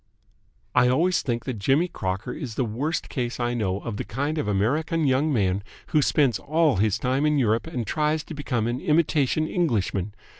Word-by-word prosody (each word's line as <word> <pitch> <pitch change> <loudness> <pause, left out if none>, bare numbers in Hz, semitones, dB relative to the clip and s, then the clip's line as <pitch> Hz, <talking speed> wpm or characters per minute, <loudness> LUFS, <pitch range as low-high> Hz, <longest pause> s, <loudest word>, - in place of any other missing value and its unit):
" - - -42 0.3
I 125 0 +5
always 165 +9 +2
think 120 -2 -2
that 125 -5 -4
Jimmy 135 - +2
Crocker 100 - -4
is 125 -8 -6
the 130 - 0
worst 135 +9 -2
case 125 -2 -3
I 120 0 0
know 100 -4 -1
of 115 -4 -5
the - - -3
kind 145 +7 -2
of 110 - -2
American 150 +11 +1
young 140 +3 +2
man 100 -5 +1 0.3
who 155 - +3
spends 140 -4 +2
all 155 - +2
his 105 0 +2
time 130 +3 0
in 150 -1 +2
Europe 115 0 +1
and 125 -8 -3
tries 150 +3 0
to - - -9
become 125 -6 -2
an 120 +2 -2
imitation 155 -1 +2
Englishman. 105 - -1
130 Hz, 195 wpm, -25 LUFS, 110-150 Hz, 0.3 s, I